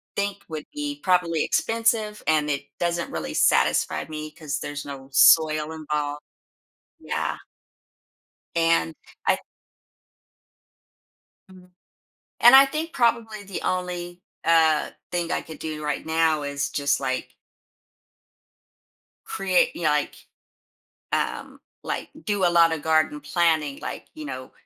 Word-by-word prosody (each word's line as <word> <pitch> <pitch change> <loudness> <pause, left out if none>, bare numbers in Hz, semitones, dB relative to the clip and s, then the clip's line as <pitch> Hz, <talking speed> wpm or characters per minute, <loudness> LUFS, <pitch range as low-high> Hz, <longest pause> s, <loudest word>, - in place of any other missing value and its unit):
think, 200 0 -2
would 155 -2 -6
be 295 -1 -4
probably 175 -4 +2
expensive, 225 -2 0
and 155 -1 +2
it 140 -1 -2
doesn't 170 0 -1
really 80 -2 -4
satisfy - - +2
me 155 0 -6
'cause 150 -2 -5
there's 145 0 -6
no 135 -1 -9
soil 155 +2 +5
involved. 150 -2 -3 0.8
Yeah. - - -3 1.2
And 165 - +2 0.3
I - - +3 2.1
Mhm. 180 -1 -16 0.7
And 240 +3 +9
I 275 +1 +8
think 315 +4 -4
probably 230 -3 0
the 195 -1 -6
only, 180 -1 -3 0.2
uh, 160 -2 +3 0.2
thing 175 -1 -2
I - - -1
could 160 - -11
do 155 -1 -5
right 150 0 -2
now 160 -1 +1
is 140 0 -2
just 140 -1 0
like 130 0 -3 1.9
create - - +1
you - - -6
know, - - +4
like, - - 0 1.0
um, - - -2 0.2
like, - - -4 0.2
do 205 -3 +1
a - - +5
lotta 165 -1 +4
garden 155 -1 +1
planning, 155 -3 +1
like, - - -6
you 310 -1 -7
know, 130 - -7
165 Hz, 120 wpm, -24 LUFS, 150-200 Hz, 2.1 s, And